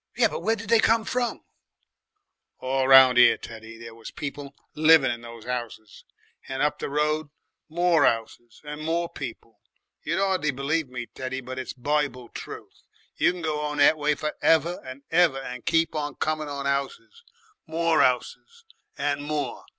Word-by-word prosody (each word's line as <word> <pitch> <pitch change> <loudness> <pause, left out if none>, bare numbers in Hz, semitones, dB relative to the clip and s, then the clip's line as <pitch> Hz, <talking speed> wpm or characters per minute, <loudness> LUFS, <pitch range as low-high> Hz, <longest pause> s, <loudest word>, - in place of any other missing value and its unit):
"Yes, - - +3
but 485 - -4
where 225 - +1
did 220 -1 -9
they 230 -1 +5
come 225 0 +3
from?" 245 0 -2 1.1
"All 130 0 -1
round 130 -2 +8
'ere, 125 - +7
Teddy, 115 0 -10
there 115 0 -10
was 115 -1 -10
people 140 -1 -7 0.2
living 155 -4 +5
in 120 -1 -5
those 115 -1 -11
'ouses, 120 -4 -6 0.4
and 135 +1 -2
up 150 - 0
the - - -4
road 150 +1 0 0.4
more 170 -1 +3
'ouses 115 0 -1
and 150 0 -7
more 170 +2 0
people. 120 -7 -9 0.4
You'd 170 +3 -2
'ardly 190 -5 +1
believe 140 +2 -1
me, 125 -1 -5
Teddy, 130 +2 -6
but 130 0 -7
it's 130 - -5
Bible 135 -2 -2
truth. - - -10 0.4
You - - +3
can 180 -1 -8
go 155 -2 -1
on 150 0 -3
that 145 +2 +6
way 150 0 0
for 150 +1 -4
ever 165 +2 +2
and 130 +2 -10
ever, 165 -4 +4
and 125 -2 -7
keep 165 0 +2
on 150 -1 -3
coming 155 -1 -2
on 140 -1 -5
'ouses, 140 - -3 0.4
more 165 0 +2
'ouses, 460 - -1 0.3
and 145 0 -1
more. 150 0 -4
145 Hz, 170 wpm, -25 LUFS, 130-160 Hz, 1.1 s, round